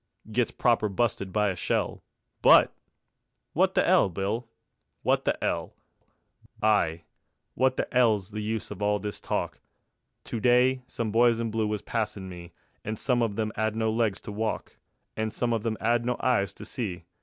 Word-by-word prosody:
Gets 120 Hz, +1 st, +1 dB
proper 115 Hz, -3 st, +2 dB
busted 100 Hz, -2 st, -1 dB
by 105 Hz, +1 st, +2 dB
a 95 Hz, -, -2 dB
shell, 90 Hz, -, -1 dB, 0.4 s
But... -, -, +7 dB, 0.8 s
wot -, -, +2 dB
the -, -, +3 dB
'ell, -, -, +5 dB
Bill? 105 Hz, +6 st, -3 dB, 0.5 s
Wot -, -, +2 dB
the -, -, +1 dB
'ell? -, -, -2 dB, 0.8 s
Ay, 100 Hz, -6 st, +2 dB, 0.5 s
wot 130 Hz, +1 st, +2 dB
the -, -, 0 dB
'ell's 110 Hz, -5 st, +3 dB
the 105 Hz, +1 st, -4 dB
use 110 Hz, 0 st, -3 dB
of 105 Hz, -1 st, -7 dB
all 105 Hz, 0 st, +2 dB
this 105 Hz, +1 st, -5 dB
talk? -, -, -2 dB, 0.6 s
To 115 Hz, -, -4 dB
day 125 Hz, +2 st, +4 dB
some 115 Hz, -4 st, -3 dB
boys 115 Hz, +1 st, +4 dB
in 115 Hz, -1 st, -2 dB
blue 110 Hz, -1 st, 0 dB
was 105 Hz, -1 st, -3 dB
passin' 105 Hz, -4 st, -2 dB
me, 85 Hz, -1 st, -9 dB, 0.3 s
And 110 Hz, +1 st, -4 dB
some 125 Hz, +1 st, +1 dB
of 110 Hz, -3 st, -1 dB
'em 110 Hz, -1 st, 0 dB
they -, -, -3 dB
'ad 110 Hz, 0 st, 0 dB
no 110 Hz, 0 st, +1 dB
legs 110 Hz, -3 st, +1 dB
to -, -, -7 dB
walk, 110 Hz, +1 st, -3 dB, 0.4 s
And 110 Hz, 0 st, -2 dB
some 120 Hz, +1 st, 0 dB
of 110 Hz, -2 st, -1 dB
'em 110 Hz, -1 st, -1 dB
they -, -, -6 dB
'ad 120 Hz, 0 st, +3 dB
no 125 Hz, 0 st, -1 dB
eyes 100 Hz, -6 st, +1 dB
to -, -, -9 dB
see. 95 Hz, -10 st, -5 dB
110 Hz, 185 wpm, -27 LUFS, 105-120 Hz, 0.8 s, But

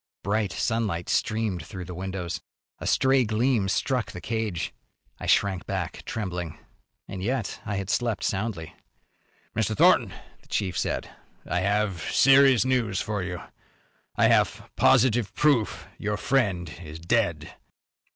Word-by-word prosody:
Bright 100 Hz, 0 st, 0 dB
sunlight 110 Hz, -8 st, -1 dB
streamed 110 Hz, -6 st, 0 dB
through 90 Hz, -2 st, -8 dB
the 90 Hz, -, -7 dB
windows. 90 Hz, -1 st, -4 dB, 0.4 s
A -, -, -5 dB
stray 130 Hz, -1 st, +4 dB
gleam 110 Hz, -2 st, +1 dB
struck 125 Hz, +4 st, 0 dB
the -, -, -7 dB
cage. 110 Hz, -4 st, -3 dB, 0.5 s
I -, -, -5 dB
shrank 95 Hz, -3 st, +2 dB
back, -, -, -3 dB
trembling. 90 Hz, -6 st, -4 dB, 0.5 s
And 95 Hz, -1 st, -6 dB
yet 120 Hz, +1 st, -2 dB
I 105 Hz, -, -1 dB
had 100 Hz, 0 st, -2 dB
slept 120 Hz, -3 st, 0 dB
soundly. 95 Hz, -5 st, -2 dB, 0.8 s
"Mr. 110 Hz, -1 st, 0 dB
Thornton," -, -, +5 dB, 0.3 s
the -, -, -25 dB
chief 95 Hz, -3 st, -1 dB
said, -, -, -1 dB, 0.4 s
"I 90 Hz, -, 0 dB
have 100 Hz, -2 st, 0 dB
serious 135 Hz, -, +5 dB
news 120 Hz, -7 st, +1 dB
for 105 Hz, -3 st, -2 dB
you. 90 Hz, -1 st, -5 dB, 0.7 s
I -, -, +4 dB
have -, -, +1 dB
positive 120 Hz, -4 st, +3 dB
proof 140 Hz, -8 st, +2 dB
your 105 Hz, 0 st, -1 dB
friend 100 Hz, -, 0 dB
is 80 Hz, -2 st, -8 dB
dead." 85 Hz, -4 st, 0 dB
105 Hz, 135 wpm, -26 LUFS, 90-115 Hz, 0.8 s, Thornton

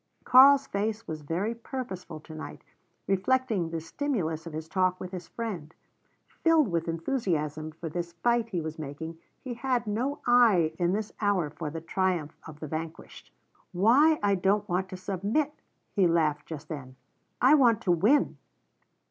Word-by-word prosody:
Karl's 275 Hz, +2 st, +7 dB
face 215 Hz, +2 st, -3 dB
was 155 Hz, -1 st, -5 dB
very 175 Hz, +9 st, -2 dB
purposeful 225 Hz, -, -6 dB
tonight, 155 Hz, 0 st, -9 dB, 0.4 s
reflecting 205 Hz, -2 st, +1 dB
the 165 Hz, 0 st, -3 dB
stimulus 165 Hz, -, -3 dB
of 165 Hz, -, -8 dB
his 155 Hz, +1 st, -5 dB
talk 185 Hz, +1 st, +1 dB
with 180 Hz, -, -7 dB
his 180 Hz, -3 st, -7 dB
friend. 185 Hz, -9 st, -6 dB, 0.7 s
Filled 325 Hz, -7 st, +4 dB
with 170 Hz, -1 st, -1 dB
enthusiasm 165 Hz, -, -2 dB
for 165 Hz, +1 st, -7 dB
this 170 Hz, +1 st, -4 dB
fight 235 Hz, +6 st, +1 dB
he 180 Hz, -6 st, -2 dB
was 160 Hz, 0 st, -6 dB
making, 160 Hz, +3 st, -6 dB, 0.2 s
he 255 Hz, -3 st, -4 dB
had 245 Hz, 0 st, -1 dB
no 245 Hz, +7 st, -1 dB
eye 220 Hz, -10 st, +5 dB
in 175 Hz, +1 st, +2 dB
this 215 Hz, +1 st, -2 dB
hour 190 Hz, -7 st, +1 dB
for 155 Hz, 0 st, -5 dB
the 160 Hz, +2 st, -6 dB
triumph 175 Hz, -2 st, -1 dB
of 155 Hz, -1 st, -11 dB
the 155 Hz, -, -6 dB
vanquished. 160 Hz, +2 st, -7 dB, 0.4 s
"Why 255 Hz, -, +5 dB
I 200 Hz, -1 st, +3 dB
don't 195 Hz, +2 st, +1 dB
want 185 Hz, +1 st, -1 dB
to 185 Hz, -, -7 dB
submit," 200 Hz, -, -1 dB, 0.4 s
he 195 Hz, -4 st, +4 dB
laughed 155 Hz, -3 st, +1 dB
just 155 Hz, -3 st, -7 dB
then. 130 Hz, -5 st, -7 dB, 0.4 s
"I -, -, +6 dB
want 240 Hz, -7 st, +5 dB
to 180 Hz, -, +1 dB
win!" 210 Hz, -, +3 dB
185 Hz, 160 wpm, -28 LUFS, 160-230 Hz, 0.7 s, Karl's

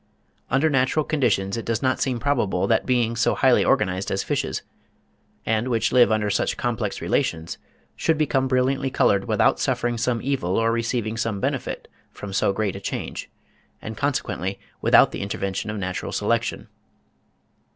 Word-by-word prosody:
Under 135 Hz, +5 st, +3 dB
natural 140 Hz, +1 st, +1 dB
conditions 115 Hz, -8 st, 0 dB
it 115 Hz, -, -5 dB
does 115 Hz, +1 st, -1 dB
not 130 Hz, -1 st, +1 dB
seem 130 Hz, -3 st, 0 dB
probable 115 Hz, -10 st, 0 dB
that 115 Hz, -2 st, +1 dB
beings 120 Hz, -2 st, +1 dB
so -, -, +2 dB
highly -, -, +4 dB
organised 95 Hz, +1 st, +1 dB
as 95 Hz, -, -1 dB
fishes, -, -, -2 dB, 0.8 s
and 110 Hz, +2 st, 0 dB
which 115 Hz, -3 st, +1 dB
live 125 Hz, -3 st, +5 dB
under 105 Hz, -1 st, +1 dB
such 100 Hz, -, 0 dB
complex 115 Hz, -4 st, -2 dB
relations, 80 Hz, +1 st, -1 dB, 0.4 s
should 160 Hz, -1 st, +1 dB
become 135 Hz, -3 st, +1 dB
brilliantly 135 Hz, +1 st, +1 dB
coloured 100 Hz, -6 st, +2 dB
without -, -, +2 dB
suffering 120 Hz, -1 st, 0 dB
some 120 Hz, 0 st, 0 dB
evil 125 Hz, -9 st, -1 dB
or 115 Hz, 0 st, +2 dB
receiving 115 Hz, -1 st, -1 dB
some 115 Hz, -3 st, -2 dB
benefit -, -, -3 dB, 0.2 s
from 100 Hz, -1 st, -8 dB
so 95 Hz, -, +2 dB
great 100 Hz, -1 st, -2 dB
a -, -, -5 dB
change, -, -, -5 dB, 0.5 s
and 110 Hz, -, -7 dB
consequently 105 Hz, -8 st, -2 dB, 0.2 s
without -, -, +5 dB
the -, -, -5 dB
intervention 100 Hz, 0 st, -3 dB
of 105 Hz, -, -3 dB
natural 95 Hz, -2 st, -4 dB
selection. -, -, -1 dB
115 Hz, 160 wpm, -23 LUFS, 100-130 Hz, 0.8 s, live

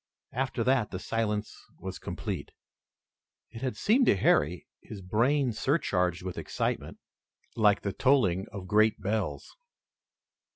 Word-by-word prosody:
After 130 Hz, -1 st, -1 dB
that 125 Hz, -3 st, +2 dB
the 95 Hz, -, -5 dB
silence 105 Hz, +1 st, -2 dB, 0.2 s
was -, -, -7 dB
complete. -, -, -5 dB, 1.0 s
It 115 Hz, -, -9 dB
had 130 Hz, -2 st, -2 dB
seemed 245 Hz, +4 st, +3 dB
to -, -, +6 dB
Harry, 85 Hz, -2 st, +2 dB
his 105 Hz, -, -9 dB
brain 120 Hz, +8 st, +1 dB
surcharged 90 Hz, -, 0 dB
with 90 Hz, -1 st, -5 dB
excitement, -, -, -3 dB, 0.6 s
like 105 Hz, -2 st, +3 dB
the 100 Hz, -, -2 dB
tolling 110 Hz, -9 st, +2 dB
of 100 Hz, -3 st, -7 dB
great 110 Hz, +2 st, +3 dB
bells. 100 Hz, -7 st, -3 dB
105 Hz, 125 wpm, -29 LUFS, 95-125 Hz, 1.0 s, to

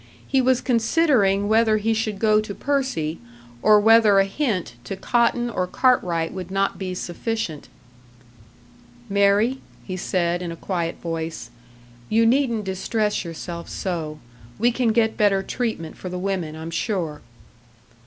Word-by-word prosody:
He 270 Hz, -, +2 dB
was 255 Hz, 0 st, +2 dB
considering 230 Hz, -5 st, +2 dB
whether 220 Hz, 0 st, +3 dB
he 225 Hz, +2 st, +1 dB
should 215 Hz, -2 st, -2 dB
go 215 Hz, 0 st, +3 dB
to 210 Hz, -2 st, -7 dB
Percy, 260 Hz, -, -1 dB, 0.4 s
or 210 Hz, -1 st, +6 dB
whether 220 Hz, -1 st, +6 dB
a 195 Hz, -, +5 dB
hint 195 Hz, -, -2 dB
to 195 Hz, -, -4 dB
Cotton 240 Hz, +3 st, +1 dB
or 185 Hz, -6 st, -2 dB
Cartwright 180 Hz, -9 st, +1 dB
would 185 Hz, -2 st, -6 dB
not 195 Hz, +1 st, -1 dB
be 185 Hz, -2 st, -4 dB
sufficient. 180 Hz, -2 st, -4 dB, 1.4 s
"Mary," 200 Hz, +6 st, +3 dB, 0.2 s
he 185 Hz, -, -5 dB
said, 175 Hz, -1 st, -1 dB
in 175 Hz, -2 st, -4 dB
a -, -, -6 dB
quiet 170 Hz, -1 st, -3 dB
voice, 165 Hz, -1 st, -5 dB, 0.6 s
"you 225 Hz, +1 st, +3 dB
needn't 235 Hz, -3 st, +2 dB
distress 205 Hz, +3 st, -1 dB
yourself 170 Hz, 0 st, -7 dB
so. 160 Hz, -5 st, -4 dB, 0.4 s
We 240 Hz, +3 st, +3 dB
can 245 Hz, 0 st, 0 dB
get 220 Hz, 0 st, +1 dB
better 200 Hz, -2 st, +3 dB
treatment 220 Hz, -8 st, -3 dB
for 185 Hz, -, -7 dB
the 180 Hz, -, -4 dB
women, 180 Hz, -4 st, -2 dB
I'm 160 Hz, +1 st, -7 dB
sure." 165 Hz, -5 st, -2 dB
200 Hz, 145 wpm, -23 LUFS, 175-225 Hz, 1.4 s, or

